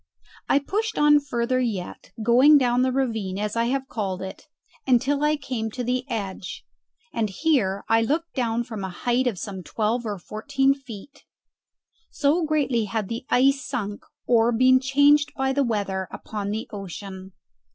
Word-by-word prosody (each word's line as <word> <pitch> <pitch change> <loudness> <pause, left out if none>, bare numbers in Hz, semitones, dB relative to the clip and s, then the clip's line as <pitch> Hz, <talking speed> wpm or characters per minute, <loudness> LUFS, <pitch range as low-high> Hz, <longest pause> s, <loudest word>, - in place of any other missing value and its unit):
I - - +5
pushed 410 +11 -2
on 295 0 +6
further 255 -2 -1
yet, 215 -8 -4
going 255 +6 +6
down 245 -2 +2
the 260 0 +2
ravine, 225 -8 -1
as 210 +1 -2
I 230 0 +1
have 265 +2 -1
called 190 -6 -3
it, 190 +10 -9 0.4
until 275 +3 +2
I 300 0 +3
came 250 -6 -4
to 250 +3 -5
the 250 +2 -2
edge; 200 -5 -5 0.5
and 220 -2 0
here 200 - +1
I 225 0 +4
looked 320 +8 -1
down 235 -2 0
from 220 -4 -7
a 190 - -3
height 245 +7 0
of 225 -6 -1
some 190 0 -6
twelve 225 +5 -1
or 205 -1 -3
fourteen 270 +9 0
feet 270 +1 -12 0.9
so 305 +4 +1
greatly 275 -7 +1
had 210 -2 -3
the 230 +2 -5
ice 275 +2 +3
sunk 205 -2 -4 0.2
or 235 -1 +4
been 255 +2 +5
changed 285 +2 +3
by 265 0 0
the 280 +1 +2
weather 200 -5 -2
upon 205 -2 -5
the 215 +2 -3
ocean. 190 -1 -8
240 Hz, 165 wpm, -24 LUFS, 210-275 Hz, 0.9 s, on